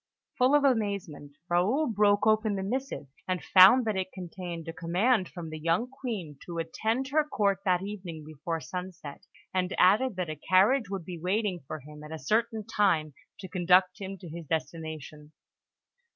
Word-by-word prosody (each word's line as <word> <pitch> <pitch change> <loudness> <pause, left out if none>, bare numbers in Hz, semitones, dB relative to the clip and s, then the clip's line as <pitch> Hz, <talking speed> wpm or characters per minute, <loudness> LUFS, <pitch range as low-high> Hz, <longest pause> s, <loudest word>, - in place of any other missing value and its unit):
Full 255 +3 +5
of 295 - +4
amazement, 200 - -1
Raoul 195 - +2
broke 205 -4 +3
open 215 -1 +3
the 190 - -3
missive, 260 - -3 0.2
and 185 -1 -2
found 200 +7 +7
that 215 -2 0
it 185 0 -2
contained 175 -2 -7
a 165 - -5
command 185 +5 +1
from 165 -3 -8
the 155 - -6
young 170 +9 +1
Queen 200 - -6
to 170 -1 -7
attend 220 +10 -1
her 305 +2 +3
Court 200 -10 0
that 180 -1 +2
evening 180 -6 -7
before 155 +2 -4
sunset, 180 -5 -7 0.3
and 185 0 0
added 215 +5 +4
that 180 -1 -2
a 155 - -4
carriage 200 +5 +4
would 195 -4 -4
be 175 -1 -7
waiting 190 +1 -1
for 155 -1 -6
him 150 +2 -12
at 150 - -10
a 160 - -4
certain 220 - 0
time, 185 -9 +1 0.3
to 190 - -7
conduct 180 +1 +3
him 195 0 -5
to 180 - -11
his 165 0 -8
destination. 155 -1 -5
185 Hz, 175 wpm, -28 LUFS, 165-215 Hz, 0.3 s, found